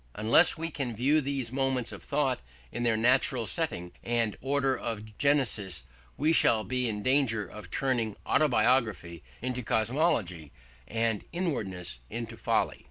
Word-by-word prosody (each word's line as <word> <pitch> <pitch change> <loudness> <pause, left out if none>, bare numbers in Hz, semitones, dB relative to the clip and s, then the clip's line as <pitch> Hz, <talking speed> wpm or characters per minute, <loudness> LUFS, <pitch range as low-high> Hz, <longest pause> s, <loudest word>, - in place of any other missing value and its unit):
Unless 115 +11 +5
we 165 +1 -4
can 130 -6 -3
view 140 +7 +3
these 135 -4 -3
movements 130 -2 0
of - - -9
thought 140 -3 0 0.3
in - - -4
their 115 -2 +2
natural 125 +1 +2
setting 100 - -2
and 115 -3 0
order 135 0 +1
of 110 -3 -6
genesis, 125 - +1 0.3
we 155 +3 +3
shall 110 -8 +4
be 125 0 -1
in 105 -1 -4
danger 130 -5 +2
of 105 -3 -11
turning 120 - 0
autobiography 115 - +2 0.2
into 125 0 -2
cosmology 110 - 0 0.4
and 115 -1 0
inwardness 100 - -3
into 115 0 -5
folly. - - 0
120 Hz, 140 wpm, -29 LUFS, 110-135 Hz, 0.4 s, Unless